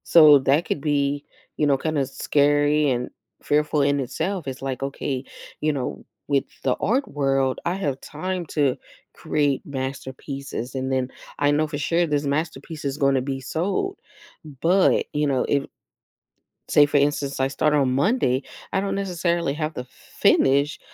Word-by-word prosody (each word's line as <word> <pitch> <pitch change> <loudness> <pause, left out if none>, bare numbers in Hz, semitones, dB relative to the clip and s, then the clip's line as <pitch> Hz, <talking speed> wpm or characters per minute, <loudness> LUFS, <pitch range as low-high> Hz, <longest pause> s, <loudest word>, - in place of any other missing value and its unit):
So 155 -4 +8
that 140 +5 +2
could 145 - -2
be, 145 -1 0 0.3
you 150 - +2
know, 140 -1 +3
kinda 155 0 -1
s 135 0 -5
scary 145 +1 +3
and 125 -1 -1 0.3
fearful 150 0 +2
in 140 0 +2
itself. 165 +7 -3
It's, 130 -1 -5
like, 135 -1 -3
okay, 135 -1 -3 0.4
you 155 0 +1
know, 135 -3 -2 0.4
w 140 -2 +2
with - - -21 0.2
the 130 -2 +2
art 260 +7 0
world, 135 -2 0
I 175 - 0
have 145 -9 -2
time 180 +3 -4
to 140 -4 +2 0.4
create 145 -3 0
masterpieces, 135 -1 -5
and 130 0 -2
then, 130 -1 0 0.3
I 145 0 +3
know 155 +1 +2
for 150 -1 -4
sure 170 +3 +1
this 145 -1 0
masterpiece 155 +1 -3
is 140 0 -2
gonna 140 -3 +2
be 135 0 -4
sold, 195 - -2 0.5
but, 165 +6 +2
you 150 0 +1
know, 130 -3 +1
if 140 -1 +1 1.0
say 145 - +6
for 145 0 +1
instance, 140 -1 0
I 135 - +2
start 150 +2 +1
on 135 -3 +2
Monday, 140 - +2 0.3
I - - +2
don't 195 - -2
necessarily 175 -5 -1
have 155 0 -2
to - - -3
f 125 - -12
finish 140 +5 +1
145 Hz, 170 wpm, -23 LUFS, 135-155 Hz, 1.0 s, So